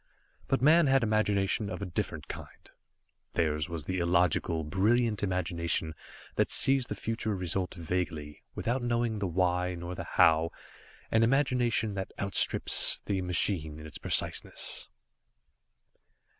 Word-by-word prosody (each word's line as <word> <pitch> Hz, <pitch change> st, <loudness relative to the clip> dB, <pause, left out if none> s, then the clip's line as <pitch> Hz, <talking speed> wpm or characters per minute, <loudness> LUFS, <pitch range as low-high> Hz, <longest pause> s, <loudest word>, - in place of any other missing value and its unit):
But 135 Hz, -1 st, 0 dB
Man 160 Hz, +2 st, +6 dB
had 135 Hz, -1 st, +3 dB
imagination 105 Hz, -2 st, +1 dB
of -, -, -5 dB
a 100 Hz, -, -4 dB
different 90 Hz, -, -4 dB
kind, -, -, -10 dB, 0.6 s
theirs 75 Hz, -1 st, 0 dB
was 85 Hz, -3 st, -4 dB
the 95 Hz, +4 st, -3 dB
illogical, 85 Hz, -2 st, +1 dB
brilliant 105 Hz, +7 st, +1 dB
imagination 85 Hz, -4 st, -1 dB, 0.4 s
that -, -, +2 dB
sees 135 Hz, -2 st, +5 dB
the -, -, -4 dB
future 110 Hz, -2 st, -2 dB
result 90 Hz, 0 st, -2 dB
vaguely, 80 Hz, -4 st, -4 dB
without 125 Hz, +3 st, -1 dB
knowing 120 Hz, -2 st, 0 dB
the 100 Hz, -, -1 dB
why, 90 Hz, 0 st, 0 dB
nor 85 Hz, +1 st, -6 dB
the -, -, -5 dB
how, 80 Hz, 0 st, +4 dB, 0.6 s
and 115 Hz, 0 st, +4 dB
imagination 120 Hz, -4 st, +1 dB
that 95 Hz, -1 st, -5 dB
outstrips 100 Hz, 0 st, +2 dB
the 95 Hz, -2 st, -1 dB
machine 90 Hz, -4 st, 0 dB
in 80 Hz, -, -10 dB
its 80 Hz, -, -9 dB
preciseness. -, -, -1 dB
95 Hz, 130 wpm, -29 LUFS, 85-115 Hz, 0.6 s, Man